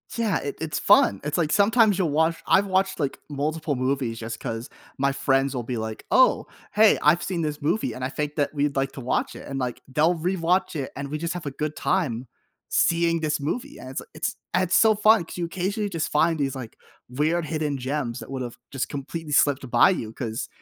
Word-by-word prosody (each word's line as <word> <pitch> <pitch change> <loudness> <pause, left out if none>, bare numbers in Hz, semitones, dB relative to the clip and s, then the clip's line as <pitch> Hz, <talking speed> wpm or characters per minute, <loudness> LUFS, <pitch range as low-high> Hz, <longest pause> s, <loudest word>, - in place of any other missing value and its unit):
yeah, 225 -6 +1
it 140 - -4
it's 160 -1 -2
fun. 100 - +5
It's 150 - -1
like 160 -3 +1
sometimes 210 +1 +4
you'll 180 -4 +1
watch 160 +2 +2
I've 200 +1 +4
watched, 190 0 +1
like, 140 -3 -2
multiple 150 +1 -2
movies 130 -2 -1
just 115 0 -6
'cause 115 +1 -5 0.3
my 140 +1 +2
friends 135 0 +1
will 125 -2 -3
be 125 +2 -4
like, 110 0 -5
"Oh, 260 - +4 0.3
hey, 215 0 +6
I've 170 - +4
seen 180 -3 -2
this 150 -1 -3
movie, 170 +10 0
and 130 - -5
I - - -2
think 150 +1 -3
that 145 -1 0
we'd 145 -1 0
like 135 0 0
to 135 - -7
watch 125 - -1
it." - - -9
And, 135 -1 -4
like, 125 -2 -3
they'll 160 +5 +3
rewatch 180 +1 0
it, 135 - -4
and 140 0 -5
we 150 - -3
just 165 +2 -3
have 175 -3 -6
a 140 - -3
good 150 +2 -3
time 130 -10 -1 0.4
seeing 170 0 +2
this 155 -2 -1
movie, 155 - -3
and 130 - -9
it's 130 - -4
it's 155 - -3 0.2
it's 185 0 +2
so 220 -1 +5
fun 215 -3 +4
'cause - - -9
you 175 - -1
occasionally 195 +5 -2
just 165 -5 -2
find 160 +1 +2
these, 135 -2 -1
like, 125 -4 -8 0.3
weird 155 +7 0
hidden 150 -3 -2
gems 130 -2 -3
that - - -10
would've 125 -3 -5
just 135 -2 -2
completely 150 +2 -5
slipped 140 -3 +3
by - - +6
you 115 -12 -2
'cause 115 -3 -4
150 Hz, 220 wpm, -25 LUFS, 135-175 Hz, 0.4 s, hey